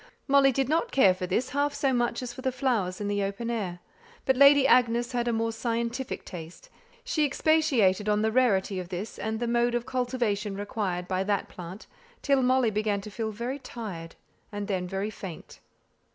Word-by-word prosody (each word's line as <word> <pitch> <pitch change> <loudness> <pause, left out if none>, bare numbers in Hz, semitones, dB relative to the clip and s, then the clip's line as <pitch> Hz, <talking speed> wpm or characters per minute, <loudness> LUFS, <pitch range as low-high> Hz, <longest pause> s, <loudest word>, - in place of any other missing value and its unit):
Molly 275 -1 +5
did 270 0 0
not 330 - 0
care 195 -9 +5
for 185 0 -5
this 240 +8 0
half 285 +1 0
so 270 -2 +1
much 240 +1 0
as 245 -1 -5
for 260 - -9
the 260 0 0
flowers 230 -9 -1
in 205 - -3
the 205 0 0
open 200 +4 -3
air; 185 -6 -3 0.4
but 265 - +3
Lady 280 +1 +7
Agnes 240 -1 +3
had 240 -1 -1
a - - +2
more 225 0 0
scientific 235 +2 -3
taste, 170 -2 -10 0.3
she - - 0
expatiated 265 - +2
on 210 0 +2
the 220 - +2
rarity 205 -6 +2
of 180 -1 -7
this 185 +4 -5
plant, - - -4
and 220 0 -2
the 240 - -1
mode 240 0 +2
of 240 0 -1
cultivation 245 -6 -1
required 200 -4 -3
by 185 0 0
that, 190 -2 -4 0.4
till 275 -2 +3
Molly 255 -2 +3
began 210 -1 0
to 210 +1 -9
feel 220 +1 -3
very 240 +6 -4
tired, 190 -11 -7 0.4
and 205 -1 -4
then 185 -3 -2
very 195 +3 -3
faint. 190 -5 -9
230 Hz, 195 wpm, -27 LUFS, 200-255 Hz, 0.4 s, Lady